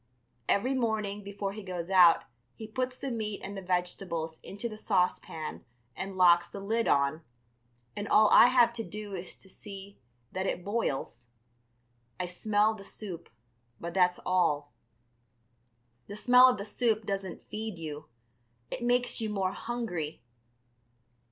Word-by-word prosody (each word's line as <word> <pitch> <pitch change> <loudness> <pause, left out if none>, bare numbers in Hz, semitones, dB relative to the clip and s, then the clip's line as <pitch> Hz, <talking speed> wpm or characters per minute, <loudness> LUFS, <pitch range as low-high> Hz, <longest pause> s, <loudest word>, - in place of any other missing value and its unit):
Every 250 +7 +2
morning 215 -5 -1
before 200 0 -4
he 215 - -7
goes 180 -2 -5
out 180 -3 +7 0.3
he 220 - -8
puts 255 +3 -3
the 275 - -4
meat 215 -3 -3
and 200 +1 -6
the 195 - -5
vegetables 180 -3 -2
into 205 +4 -5
the 215 - -7
saucepan 180 -6 -1 0.3
and 190 0 -5
locks 175 -1 +5
the 200 - -7
lid 225 +4 0
on, 140 +3 +2 0.7
and 205 0 -4
all 215 +1 +6
I - - +9
have 245 -2 +4
to 230 -1 -3
do 210 -1 -7
is 180 -1 -6
to - - -18
see 195 +1 -9 0.3
that 190 +1 -2
it 175 - -3
boils. 135 - -2 0.9
I 180 - -1
smell 210 +4 +1
the 205 -2 -10
soup, 195 -4 -8 0.5
but 170 0 -5
that's 180 -1 +3
all. 175 -5 +1 1.3
The 205 - -7
smell 250 +3 +7
of 250 - 0
the 200 - -5
soup 220 -1 0
doesn't 195 -3 -4
feed 215 -3 -4
you; 150 -2 -7 0.6
it - - -4
makes 245 0 +1
you 220 - -1
more 195 -3 0
hungry. 190 - -4
200 Hz, 150 wpm, -30 LUFS, 180-220 Hz, 1.3 s, I